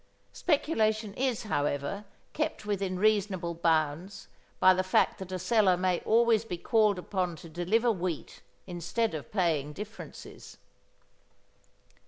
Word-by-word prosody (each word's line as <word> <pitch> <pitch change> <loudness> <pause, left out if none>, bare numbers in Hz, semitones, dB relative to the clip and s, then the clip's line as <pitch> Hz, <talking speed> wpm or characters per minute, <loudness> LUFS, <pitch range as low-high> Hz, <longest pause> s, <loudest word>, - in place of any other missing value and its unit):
Speculation 220 - +1
is, 255 -2 -1
however, 145 +1 -2 0.3
kept 310 -7 -2
within 195 -3 -1
reasonable 195 -4 +1
bounds 165 +3 -1 0.3
by 185 - +7
the 185 - +1
fact 185 - +2
that 190 -1 -7
a 185 - -2
seller 185 -1 +3
may 180 -1 +1
always 225 -1 +3
be 185 -6 -5
called 215 +1 +2
upon 180 -1 -2
to 165 - -11
deliver 185 +9 +1
wheat 180 -6 -4 0.2
instead 180 +5 -2
of 155 -3 -6
paying 160 -7 0
differences. 210 +5 -10
190 Hz, 125 wpm, -29 LUFS, 175-215 Hz, 0.3 s, by